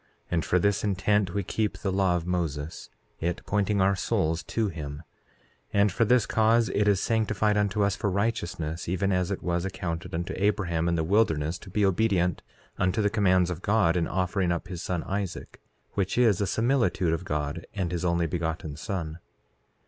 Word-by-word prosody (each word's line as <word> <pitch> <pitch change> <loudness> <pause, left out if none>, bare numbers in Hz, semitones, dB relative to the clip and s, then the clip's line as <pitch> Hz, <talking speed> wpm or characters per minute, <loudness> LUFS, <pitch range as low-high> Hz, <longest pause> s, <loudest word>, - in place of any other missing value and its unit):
And 85 -2 +1
for 90 - +2
this 100 +2 +1
intent 100 -1 +1
we 100 - 0
keep 105 +4 -1
the 95 - -2
law 95 -2 +2
of 85 -1 -2
Moses, 80 -4 -3 0.3
it 85 +1 -2
pointing 100 0 +1
our 100 +1 +3
souls 80 -2 0
to 115 -2 0
him; 75 -2 -6 0.7
and 100 0 +3
for 115 +5 +2
this 125 0 +4
cause 115 +2 +3
it 105 -3 +1
is 100 -2 +4
sanctified 105 -1 +1
unto 105 0 +1
us 100 0 +1
for 105 -1 -1
righteousness, 90 -6 -2
even 95 +2 0
as 90 -1 +1
it 100 - -3
was 85 -1 0
accounted 90 -4 -4
unto 85 +1 -3
Abraham 90 -5 +1
in 85 - +1
the 80 - 0
wilderness 80 -4 +1
to - - -12
be 105 +2 +1
obedient 95 -3 +1 0.4
unto 90 +4 +1
the 105 -1 +2
commands 95 -4 +3
of 90 0 -5
God 100 -5 +2
in 85 -2 +1
offering 90 -1 0
up 85 +2 -3
his 90 -3 -5
son 90 -2 -2
Isaac, 95 -2 -5 0.3
which 95 +1 -1
is 110 -6 +4
a 100 - +1
similitude 115 -8 +1
of 85 +2 -2
God 75 -1 -3
and 90 -4 -1
his 85 -1 -2
Only 85 -1 +1
Begotten 80 -2 -3
Son. 85 -2 -4
95 Hz, 185 wpm, -27 LUFS, 85-105 Hz, 0.7 s, this